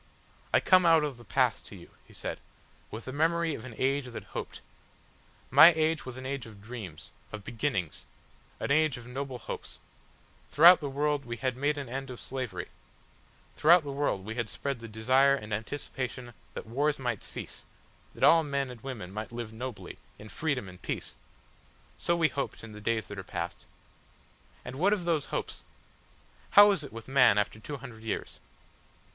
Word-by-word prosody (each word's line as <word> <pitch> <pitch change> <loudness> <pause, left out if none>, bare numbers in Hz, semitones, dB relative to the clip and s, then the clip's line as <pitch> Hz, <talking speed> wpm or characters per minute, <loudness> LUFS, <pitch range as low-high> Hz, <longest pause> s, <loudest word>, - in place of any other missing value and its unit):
"I - - +5
come 185 -1 +5
out 165 -2 +6
of 145 -4 -3
the 120 - -13
past 105 - +1
to - - -10
you," - - -13
he - - -19
said, - - -5 0.5
"with 110 +2 -8
the 130 - -6
memory 165 +2 +1
of 120 -3 -7
an 120 -4 -9
age 135 0 +1
that 120 - -7
hoped. - - -5 0.9
My 170 +2 +10
age 160 -2 0
was 130 0 -7
an 130 - -8
age 135 -2 -4
of 105 -2 -13
dreams 105 -7 -8 0.2
of 110 -2 -7
beginnings, 110 - -2 0.5
an - - -2
age 155 -3 +3
of 120 - -10
noble 130 +1 -5
hopes; - - -7 0.7
throughout 175 +4 +8
the 145 - -4
world 145 +1 0
we 120 -2 -5
had 130 0 -1
made 145 +3 0
an 140 -2 -4
end 135 +3 -5
of 125 - -7
slavery; 125 -9 -5 0.9
throughout 170 +2 +6
the 145 - -5
world 135 -9 -1
we 110 - -4
had 115 -2 -2
spread 140 +2 -3
the 115 - -8
desire 130 +6 +4
and 105 -5 -6
anticipation 125 +1 -5 0.2
that - - -5
wars 140 +6 0
might 120 -6 -3
cease, - - -5 0.5
that - - -5
all 165 - +8
men 140 -3 -2
and 120 -3 -11
women 110 -9 -7
might 110 +2 -5
live 115 -2 -6
nobly, 120 -1 -7 0.2
in 105 - -11
freedom 140 -8 -2
and 90 0 -12
peace.... - - -5 0.8
So 170 - +1
we 165 -2 +3
hoped 140 - -4
in 115 - -9
the 105 0 -10
days 110 -1 0
that 100 +1 -8
are - - -6
past. - - -5 1.0
And 125 +1 -7
what 195 +7 +3
of 190 -5 -2
those 160 -5 +1
hopes? - - -4 0.9
How 205 0 +11
is 185 -7 -1
it 140 - -9
with 115 0 -9
man 130 -5 +5
after 105 +1 0
two 145 +6 -6
hundred 120 -4 -11
years? 115 - -4
130 Hz, 185 wpm, -29 LUFS, 115-145 Hz, 1.0 s, How